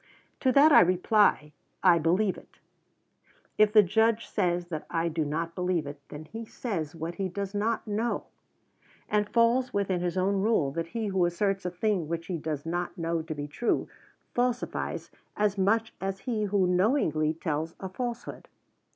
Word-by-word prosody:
To 260 Hz, -, +2 dB
that 290 Hz, +4 st, +7 dB
I -, -, +9 dB
reply, 180 Hz, -3 st, +3 dB, 0.3 s
I 175 Hz, -3 st, +6 dB
believe 180 Hz, +5 st, +2 dB
it. -, -, -16 dB, 1.0 s
If 210 Hz, -1 st, +6 dB
the 215 Hz, -1 st, +7 dB
Judge 220 Hz, +4 st, +2 dB
says 175 Hz, -3 st, -1 dB
that 155 Hz, -3 st, -5 dB
I 170 Hz, 0 st, 0 dB
do 160 Hz, 0 st, -1 dB
not 165 Hz, +3 st, -3 dB
believe 180 Hz, -3 st, -1 dB
it, 145 Hz, 0 st, -7 dB
then 150 Hz, +1 st, -8 dB
he 225 Hz, +8 st, -7 dB
says 180 Hz, -, -4 dB
what 165 Hz, +1 st, -4 dB
he 190 Hz, -, -1 dB
does 200 Hz, +2 st, -4 dB
not 220 Hz, +3 st, -1 dB
know, 220 Hz, +2 st, -1 dB, 0.8 s
and 210 Hz, 0 st, +1 dB
falls 240 Hz, +2 st, +2 dB
within 190 Hz, -3 st, 0 dB
his 175 Hz, +1 st, -2 dB
own 195 Hz, +1 st, +1 dB
rule 200 Hz, -10 st, +2 dB
that 165 Hz, +3 st, -3 dB
he 225 Hz, +4 st, -3 dB
who 190 Hz, -2 st, +1 dB
asserts 195 Hz, +2 st, 0 dB
a -, -, 0 dB
thing 180 Hz, -2 st, -1 dB
which 170 Hz, +1 st, -3 dB
he 175 Hz, -3 st, -3 dB
does 155 Hz, -1 st, -4 dB
not 175 Hz, +3 st, -3 dB
know 165 Hz, -1 st, -1 dB
to 160 Hz, 0 st, -6 dB
be 145 Hz, 0 st, -5 dB
true, 230 Hz, +11 st, -1 dB, 0.5 s
falsifies 245 Hz, 0 st, -2 dB, 0.3 s
as 210 Hz, -1 st, +2 dB
much 220 Hz, +4 st, +1 dB
as 195 Hz, 0 st, -3 dB
he 225 Hz, -4 st, -1 dB
who 200 Hz, -2 st, +2 dB
knowingly 180 Hz, -, +2 dB
tells 160 Hz, -1 st, -3 dB
a 190 Hz, -, -5 dB
falsehood. 240 Hz, +5 st, -5 dB
185 Hz, 175 wpm, -28 LUFS, 165-215 Hz, 1.0 s, I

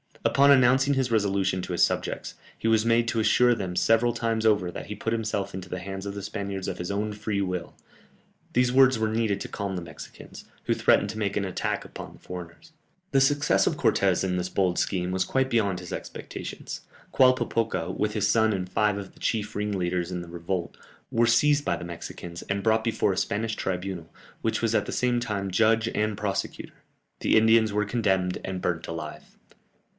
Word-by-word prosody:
Upon 140 Hz, +1 st, +5 dB
announcing 135 Hz, +1 st, +5 dB
his 130 Hz, -2 st, 0 dB
resolution 100 Hz, -3 st, +1 dB
to -, -, -5 dB
his 85 Hz, 0 st, +3 dB
subjects, -, -, -1 dB, 0.2 s
he -, -, -2 dB
was 110 Hz, 0 st, +3 dB
made 115 Hz, 0 st, +3 dB
to 115 Hz, -, 0 dB
assure 120 Hz, +2 st, +4 dB
them 95 Hz, -6 st, -4 dB
several 115 Hz, +5 st, +3 dB
times 115 Hz, -1 st, -1 dB
over 100 Hz, -5 st, +2 dB
that -, -, -7 dB
he 105 Hz, -, -5 dB
put 115 Hz, -, -2 dB
himself 110 Hz, -3 st, -2 dB
into 90 Hz, -1 st, -7 dB
the 90 Hz, -, -4 dB
hands 95 Hz, +1 st, -6 dB
of 100 Hz, -, -5 dB
the 100 Hz, -, -5 dB
Spaniards 100 Hz, -1 st, -4 dB
of -, -, -3 dB
his 90 Hz, -, -4 dB
own 105 Hz, +1 st, -2 dB
free 105 Hz, -1 st, -2 dB
will; 90 Hz, -2 st, -3 dB, 0.8 s
these 125 Hz, 0 st, +3 dB
words 130 Hz, -1 st, +5 dB
were 110 Hz, 0 st, +1 dB
needed 110 Hz, -2 st, 0 dB
to -, -, -4 dB
calm 100 Hz, -2 st, -4 dB
the 90 Hz, -, -3 dB
Mexicans, 85 Hz, -2 st, -11 dB, 0.2 s
who -, -, +1 dB
threatened -, -, +3 dB
to 110 Hz, -, -8 dB
make 100 Hz, -2 st, -1 dB
an 100 Hz, -, 0 dB
attack 95 Hz, -, -2 dB
upon -, -, -9 dB
the -, -, -17 dB
foreigners. 90 Hz, -, -9 dB, 0.4 s
The 135 Hz, -2 st, +4 dB
success 145 Hz, +2 st, +3 dB
of -, -, 0 dB
Cortès -, -, +2 dB
in 90 Hz, -1 st, 0 dB
this 90 Hz, 0 st, -2 dB
bold 90 Hz, -1 st, +1 dB
scheme 90 Hz, -2 st, -1 dB
was 95 Hz, 0 st, 0 dB
quite 135 Hz, 0 st, +1 dB
beyond 100 Hz, -6 st, +1 dB
his 90 Hz, -1 st, -8 dB
expectations. -, -, -7 dB, 0.3 s
Qualpopoca, 115 Hz, -8 st, +2 dB
with 105 Hz, 0 st, -1 dB
his 105 Hz, -2 st, +1 dB
son 110 Hz, 0 st, +3 dB
and 90 Hz, -2 st, -3 dB
five 105 Hz, +1 st, +1 dB
of 100 Hz, -2 st, -7 dB
the -, -, -20 dB
chief 105 Hz, -2 st, -2 dB
ringleaders 90 Hz, -4 st, -1 dB
in 90 Hz, -1 st, -3 dB
the 85 Hz, -, -9 dB
revolt, 85 Hz, +1 st, -4 dB, 0.3 s
were 115 Hz, +1 st, +3 dB
seized 145 Hz, +2 st, +3 dB
by -, -, +1 dB
the -, -, -7 dB
Mexicans, 85 Hz, 0 st, -8 dB
and 100 Hz, 0 st, -2 dB
brought 110 Hz, +1 st, +3 dB
before 115 Hz, -4 st, +1 dB
a -, -, -6 dB
Spanish 110 Hz, +3 st, -1 dB
tribunal, 90 Hz, -3 st, -4 dB, 0.3 s
which 110 Hz, 0 st, -1 dB
was 115 Hz, -1 st, +2 dB
at -, -, +2 dB
the -, -, -3 dB
same 125 Hz, -1 st, +1 dB
time 100 Hz, -5 st, -3 dB
judge 115 Hz, +3 st, +3 dB
and 105 Hz, -1 st, -1 dB
prosecutor; 100 Hz, -2 st, -3 dB, 0.5 s
the -, -, +3 dB
Indians 110 Hz, 0 st, +5 dB
were 105 Hz, 0 st, +1 dB
condemned 95 Hz, -5 st, 0 dB
and 95 Hz, -1 st, -4 dB
burnt 85 Hz, -2 st, -2 dB
alive. 75 Hz, -2 st, -6 dB
105 Hz, 200 wpm, -26 LUFS, 90-115 Hz, 0.8 s, Upon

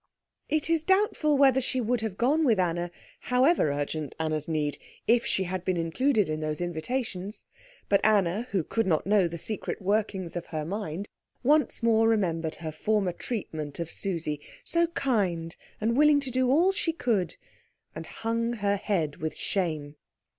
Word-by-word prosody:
It 310 Hz, -1 st, +1 dB
is 330 Hz, -1 st, +3 dB
doubtful 380 Hz, -6 st, +2 dB
whether 265 Hz, -1 st, +5 dB
she 260 Hz, +1 st, -1 dB
would 240 Hz, 0 st, 0 dB
have 215 Hz, -4 st, -4 dB
gone 290 Hz, +7 st, +3 dB
with 230 Hz, -9 st, +3 dB
Anna, 175 Hz, -1 st, 0 dB, 0.3 s
however 255 Hz, -, +3 dB
urgent 145 Hz, 0 st, -3 dB
Anna's 155 Hz, -2 st, -1 dB
need, 150 Hz, -3 st, -1 dB, 0.3 s
if 235 Hz, +1 st, +3 dB
she 190 Hz, -, +1 dB
had 185 Hz, 0 st, -3 dB
been 185 Hz, -1 st, 0 dB
included 210 Hz, -, +1 dB
in 155 Hz, 0 st, -2 dB
those 155 Hz, -1 st, -3 dB
invitations. 185 Hz, +4 st, -3 dB, 0.4 s
But 200 Hz, -, +3 dB
Anna, 210 Hz, +1 st, +2 dB
who 190 Hz, -5 st, 0 dB
could 225 Hz, +6 st, -1 dB
not 160 Hz, -4 st, +1 dB
know 200 Hz, -2 st, +4 dB
the 170 Hz, 0 st, -6 dB
secret 215 Hz, +5 st, -4 dB
workings 195 Hz, -3 st, -1 dB
of 175 Hz, -, -4 dB
her 155 Hz, -2 st, -3 dB
mind, 195 Hz, 0 st, -4 dB, 0.4 s
once 295 Hz, -2 st, +2 dB
more 225 Hz, -1 st, +4 dB
remembered 165 Hz, -7 st, 0 dB
her 160 Hz, -1 st, -5 dB
former 200 Hz, +4 st, 0 dB
treatment 160 Hz, -, -5 dB
of 170 Hz, -1 st, -3 dB
Susie, 165 Hz, -6 st, -3 dB, 0.2 s
so 340 Hz, 0 st, +1 dB
kind 195 Hz, -, -1 dB, 0.2 s
and 225 Hz, +2 st, +1 dB
willing 300 Hz, +1 st, +6 dB
to 265 Hz, -2 st, -3 dB
do 255 Hz, 0 st, +2 dB
all 335 Hz, +8 st, +5 dB
she 335 Hz, -4 st, -1 dB
could, 210 Hz, -, 0 dB, 0.6 s
and -, -, -7 dB
hung 230 Hz, +1 st, -2 dB
her 205 Hz, -3 st, 0 dB
head 170 Hz, -8 st, -1 dB
with 160 Hz, 0 st, -3 dB
shame. 155 Hz, -6 st, -2 dB
200 Hz, 170 wpm, -28 LUFS, 165-245 Hz, 0.6 s, willing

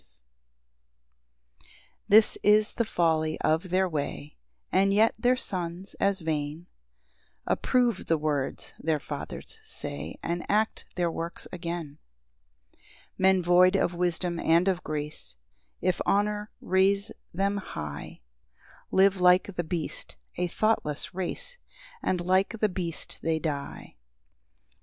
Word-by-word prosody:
PAUSE. -, -, -17 dB, 1.4 s
8 -, -, -25 dB, 0.4 s
This 215 Hz, +1 st, +6 dB
is 210 Hz, +1 st, +4 dB
the 235 Hz, -, 0 dB
folly 160 Hz, -5 st, +1 dB
of 160 Hz, +4 st, +1 dB
their 185 Hz, +1 st, +2 dB
way; 145 Hz, -2 st, -4 dB, 0.4 s
And 195 Hz, +1 st, +4 dB
yet 220 Hz, +2 st, +5 dB
their 245 Hz, +2 st, +4 dB
sons, 185 Hz, -4 st, -4 dB
as 195 Hz, -1 st, +1 dB
vain, 155 Hz, +1 st, -2 dB, 0.8 s
Approve 245 Hz, -2 st, +1 dB
the 165 Hz, -, +3 dB
words 150 Hz, -3 st, -2 dB
their 155 Hz, -1 st, 0 dB
fathers -, -, -7 dB
say, 145 Hz, 0 st, -6 dB
And 170 Hz, +1 st, -2 dB
act 215 Hz, +2 st, +1 dB
their 175 Hz, -2 st, +1 dB
works 165 Hz, +1 st, -5 dB
again. 170 Hz, -4 st, -5 dB, 0.7 s
9 -, -, -34 dB, 0.4 s
Men 190 Hz, -1 st, +4 dB
void 180 Hz, +2 st, +5 dB
of 180 Hz, -, +2 dB
wisdom 175 Hz, 0 st, -1 dB
and 170 Hz, +3 st, +3 dB
of 185 Hz, -2 st, +1 dB
grace, 150 Hz, -, -2 dB, 0.5 s
If 185 Hz, -1 st, +1 dB
honour 210 Hz, +1 st, +1 dB
raise 195 Hz, +3 st, +2 dB, 0.2 s
them 200 Hz, +3 st, 0 dB
high. 75 Hz, -, -6 dB, 0.7 s
Live 190 Hz, -1 st, +4 dB
like 180 Hz, +2 st, +4 dB
the 175 Hz, -, -1 dB
beast, 160 Hz, -, -4 dB, 0.2 s
a 180 Hz, -, 0 dB
thoughtless 175 Hz, -7 st, 0 dB
race, 485 Hz, -, -4 dB, 0.4 s
And 185 Hz, -, 0 dB
like 185 Hz, +5 st, +2 dB
the 215 Hz, -1 st, +2 dB
beast 175 Hz, -3 st, -5 dB
they 165 Hz, -1 st, +1 dB
die. 145 Hz, -, -5 dB
180 Hz, 125 wpm, -28 LUFS, 160-195 Hz, 1.4 s, This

